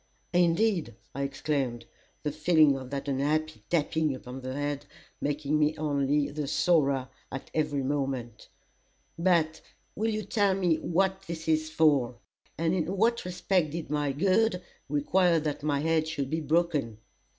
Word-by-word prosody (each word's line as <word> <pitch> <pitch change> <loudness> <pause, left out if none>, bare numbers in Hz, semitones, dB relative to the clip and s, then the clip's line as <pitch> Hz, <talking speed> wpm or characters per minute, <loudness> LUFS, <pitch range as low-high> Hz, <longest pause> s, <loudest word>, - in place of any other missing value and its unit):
"Indeed!" 175 - +2 0.2
I 140 - -4
exclaimed, 135 -4 -2 0.4
the 150 - -1
feeling 155 -1 +4
of 130 -1 -7
that 140 +1 -4
unhappy 150 +3 0
tapping 160 -3 +1
upon 130 +1 -8
the 130 0 -5
head, 145 0 -3 0.3
making 145 +1 0
me 155 +1 +2
only 145 -1 +1
the 150 -1 -3
sorer 140 -5 +2 0.2
at 135 - -7
every 150 -3 0
moment 135 -5 -3 0.7
"but 165 -3 +2 0.3
will 220 +2 0
you 215 -1 -2
tell 200 -1 +2
me 180 -4 +2
what 190 +2 0
this 160 -1 -6
is 155 0 +1
for, 145 -6 +3 0.4
and 165 +1 +1
in 185 +2 -1
what 230 +2 +2
respect 180 -2 0
did 165 -3 -5
my 145 -2 0
good 185 +5 +2 0.3
require 170 +4 +3
that 150 -2 -3
my 145 -1 0
head 160 0 +1
should 145 -4 -3
be 160 +1 0
broken?" 150 -7 0
155 Hz, 150 wpm, -28 LUFS, 140-170 Hz, 0.7 s, feeling